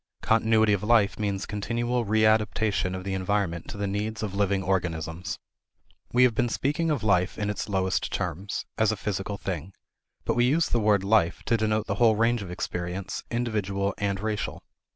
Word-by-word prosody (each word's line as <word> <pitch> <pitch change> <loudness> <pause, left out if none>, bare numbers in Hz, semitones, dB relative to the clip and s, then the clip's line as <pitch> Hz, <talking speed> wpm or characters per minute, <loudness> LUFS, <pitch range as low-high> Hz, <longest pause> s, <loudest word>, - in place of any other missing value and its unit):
Continuity 110 -1 +3
of 100 - 0
life 105 -2 +3
means 100 -2 -1
continual 120 +3 -1
readaptation 110 -3 +2
of 95 - -7
the 95 0 -3
environment 95 -3 -1
to - - -7
the 100 - -1
needs 105 +3 -2
of 100 -3 -3
living 100 -1 +1
organisms. 85 -2 -2 0.7
We 125 +1 +5
have 125 -2 +5
been 120 - +1
speaking 150 +7 0
of 145 -7 0
life 90 -3 +2
in 105 -1 -1
its 105 +1 -4
lowest 95 -2 0
terms 90 +4 -3
as 110 -1 +4
a - - -1
physical 100 0 -3
thing. 95 -1 -5 0.5
But - - +1
we 120 +1 +3
use 155 +6 +3
the 120 - +2
word 105 -3 +3
"Life" 100 -4 +2
to 115 - +2
denote 110 -1 +1
the 100 +4 -3
whole 115 -2 +6
range 115 +1 +2
of 95 - -7
experience, 90 +1 -4
individual 100 -5 -1
and 100 -1 -1
racial. 105 0 -3
105 Hz, 180 wpm, -27 LUFS, 95-110 Hz, 0.7 s, whole